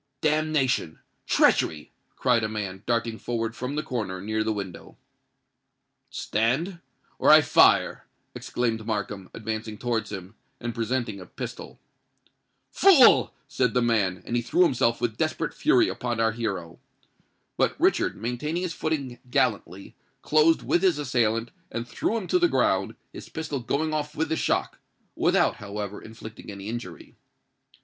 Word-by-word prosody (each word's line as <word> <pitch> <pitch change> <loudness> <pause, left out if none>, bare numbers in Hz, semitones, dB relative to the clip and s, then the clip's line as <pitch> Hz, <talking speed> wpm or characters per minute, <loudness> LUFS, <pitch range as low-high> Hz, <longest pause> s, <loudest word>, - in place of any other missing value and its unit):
"Damnation!—treachery!" 145 - +1 0.2
cried 125 -3 +2
a 110 - -1
man, 100 -3 -5
darting 115 -1 0
forward 115 -1 -3
from 130 +3 -4
the 150 - -1
corner 105 -8 -3
near 110 +3 -1
the 110 - 0
window. 100 -4 -7 1.1
"Stand—or 145 - -2
I - - +9
fire!" - - +4 0.3
exclaimed 115 -3 -2
Markham, 105 -3 -3
advancing 110 -1 -4
towards 115 -3 -2
him, 95 -1 -7 0.3
and 120 0 -4
presenting 115 -2 -2
a 90 - -10
pistol. - - -8 0.9
"Fool!" 345 -11 +6 0.2
said 125 -3 0
the 125 - +4
man; 100 -6 +1
and 120 - -3
he 120 - +2
threw 120 +9 +3
himself 125 -7 +2
with 115 -2 -1
desperate 155 0 -1
fury 335 +3 +3
upon 120 -2 -3
our 115 0 +3
hero. 95 -7 -4 0.8
But - - 0
Richard, - - +2
maintaining 135 - -2
his 175 -3 -2
footing 140 -6 -3
gallantly, 100 -5 -1 0.3
closed 155 +2 +4
with 175 - +2
his 185 -5 +3
assailant, 120 -5 0 0.2
and 115 +1 -5
threw 120 - -1
him 210 - -4
to 360 - +3
the 350 0 +4
ground, - - +1 0.2
his - - -10
pistol 155 -3 -4
going 155 +6 -1
off 150 0 -3
with 160 0 -1
the 160 - +1
shock—without, - - -1
however, 105 0 -6
inflicting 110 -1 -11
any 100 +1 -7
injury. 120 +1 -7
115 Hz, 140 wpm, -26 LUFS, 110-150 Hz, 1.1 s, I